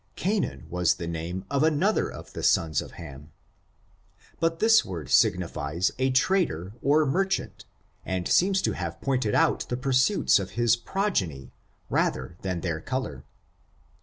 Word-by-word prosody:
Canaan 185 - -2
was 90 0 +1
the 85 - -6
name 85 +3 -4
of 140 -1 +1
another 160 +7 +2
of - - -11
the - - -5
sons 80 -2 +2
of - - -11
Ham. 75 -2 -11 1.1
But 165 0 +1
this 225 +3 +5
word 85 -8 -7
signified 85 -2 +1
a 130 0 +2
trader 130 - +1
or 150 +3 +3
merchant, 190 +7 -1 0.4
and 95 -1 -2
seems 195 +1 +3
to - - +1
have 85 -2 -5
pointed 130 -6 0
out 165 -2 +2
the 125 - -1
pursuits 130 - +3
of 95 - -6
his 120 -1 +4
progeny, 105 - -2 0.4
rather 65 +6 -1
than 90 -3 -3
their 85 -3 -2
color. 130 - -4
105 Hz, 145 wpm, -26 LUFS, -, 1.1 s, this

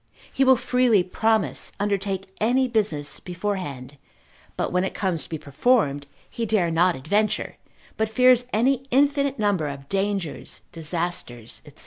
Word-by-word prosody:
He 270 - +2
will 260 0 +6
freely 245 -5 +3
promise, 195 - 0
undertake 195 -1 -2
any 255 +4 +3
business 200 -12 -1
beforehand, 175 -8 -5 0.6
but - - -1
when 180 +1 +1
it 190 - -3
comes 180 -5 0
to - - -10
be 160 - -3
performed, 145 - +1 0.2
he 235 - -5
dare 205 -6 +1
not 175 +2 +3
adventure, 205 +11 -1 0.4
but 220 0 0
fears 250 +2 +4
an 220 +3 +2 0.2
infinite 280 +1 +2
number 200 -8 +1
of 140 -1 -7
dangers, 195 -4 -2
disasters, 165 -8 -3
&c. - - -14
195 Hz, 140 wpm, -24 LUFS, 165-225 Hz, 0.6 s, will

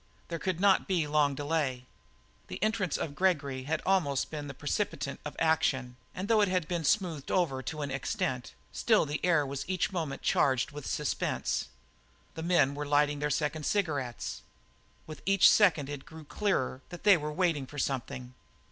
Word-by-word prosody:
There 170 -1 -3
could 180 +1 -2
not 195 0 +4
be 175 -5 +1
long 145 -1 +2
delay. 145 -4 -1 0.6
The - - -6
entrance 215 -4 0
of 145 - -4
Gregory 145 -7 0
had 155 - -1
almost 160 -9 +1
been 150 -2 -5
the 140 - -7
precipitant 150 -2 -2
of 150 -1 -6
action, 130 -6 +1 0.2
and 190 +2 -4
though 220 -1 +4
it 205 - +4
had 185 -4 0
been 170 -2 -2
smoothed 170 -6 0
over 150 -8 +1
to 150 +3 -4
an 140 - -4
extent, 130 -1 -2 0.2
still 220 -7 +3
the 150 +1 -4
air 165 -5 +3
was 135 0 -4
each 185 +1 0
moment 160 -7 -3
more - - -3
charged 130 -2 +2
with 145 -2 -7
suspense. 150 -2 -1 0.7
The 160 - -6
men 160 -5 +3
were 145 +1 -4
lighting 145 0 +2
their 150 0 0
second 150 +1 -1
cigarette. 145 - -2 0.6
With 155 -1 -9
each 195 -1 +6
second 170 -9 +5
it 145 -1 -6
grew 160 -1 -10
clearer 145 -8 -1
that 175 - -9
they 205 -1 +7
were 150 -2 -3
waiting 150 -5 0
for 145 - -11
something. 125 -2 -3
150 Hz, 180 wpm, -30 LUFS, 140-180 Hz, 0.7 s, they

